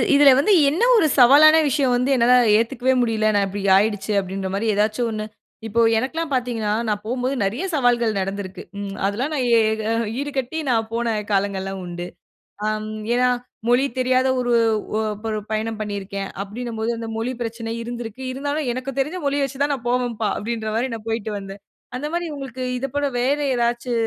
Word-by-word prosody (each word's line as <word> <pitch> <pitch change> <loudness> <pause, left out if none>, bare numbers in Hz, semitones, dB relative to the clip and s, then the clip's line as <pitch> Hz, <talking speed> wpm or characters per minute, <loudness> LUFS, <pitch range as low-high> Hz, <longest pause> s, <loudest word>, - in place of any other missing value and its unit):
இதுல 285 -1 +8
வந்து 405 +9 +3 0.2
என்ன 325 +10 0
ஒரு 415 - +4
சவாலான 295 +6 +8
விஷயம் 270 -2 +2
வந்து 250 +2 0
என்னால 245 0 +4 0.2
ஏத்துக்கவே 245 +3 +1
முடியல, 220 -2 +1
நான் 200 -1 +3
இப்டி 200 +1 -5 0.2
ஆயிடுச்சு 205 0 0
அப்டின்ற 190 0 -4
மாரி 200 +3 -1
ஏதாச்சு 215 +3 0
ஒண்ணு 215 -1 -4 0.4
இப்போ 225 +2 -1 0.2
எனக்குல்லாம் 305 +7 -2
பாத்தீங்கன்னா, 240 -4 -1 0.2
நான் 210 -1 -1
போம்போது 250 +3 -1
நெறைய 220 - -2
சவால்கள் 240 -6 +2
நடந்துருக்கு. 195 0 -4 0.2
ம். 200 -1 -5
அதெல்லாம் 230 +9 -1
நான் 275 -4 0
எ - - +5 0.2
க - - -3 0.4
ஈடு 290 +1 -3
கட்டி 265 +5 -2
நான் 225 -2 +1
போன 235 +1 -1 0.2
காலங்கள்லாம் 195 -1 -1
உண்டு. 175 0 -6 0.6
ஆம் 215 0 -2 0.3
ஏனா, 250 +1 +3 0.4
மொழி 245 +3 +4
தெரியாத 255 +1 +2
ஒரு 245 -1 0 0.4
ஒ - - +1 0.3
ஒரு 215 - -1
பயணம் 220 0 -2
பண்ணிருக்கேன், 200 -1 -4 0.2
அப்டின்னும்போது, 225 +2 -4
அந்த 230 0 -5
மொழி 235 +3 -2
பிரச்சன 230 0 -4
இருந்திருக்கு. 235 0 -7
இருந்தாலும் 285 +2 -3
"எனக்கு 255 +2 -5
தெரிஞ்ச 305 +7 -1
மொழிய 280 0 +1
வச்சு 270 0 -7
தான் 290 0 +1
நான் 240 -3 -8
போவன்பா" 240 -3 0
அப்டின்ற 220 0 -3
மாரி 245 +4 0
நான் 225 0 -10
போயிட்டு 225 -1 -2
வந்தேன். 195 0 -9 0.4
அந்த 290 +4 -4
மாரி 345 0 -1
உங்களுக்கு 260 -2 -6 0.2
இத 270 - -2
போல 285 0 +1
வேற 265 +4 +2 0.2
ஏதாச்சு 240 +1 -1
235 Hz, 175 wpm, -22 LUFS, 215-260 Hz, 0.6 s, இதுல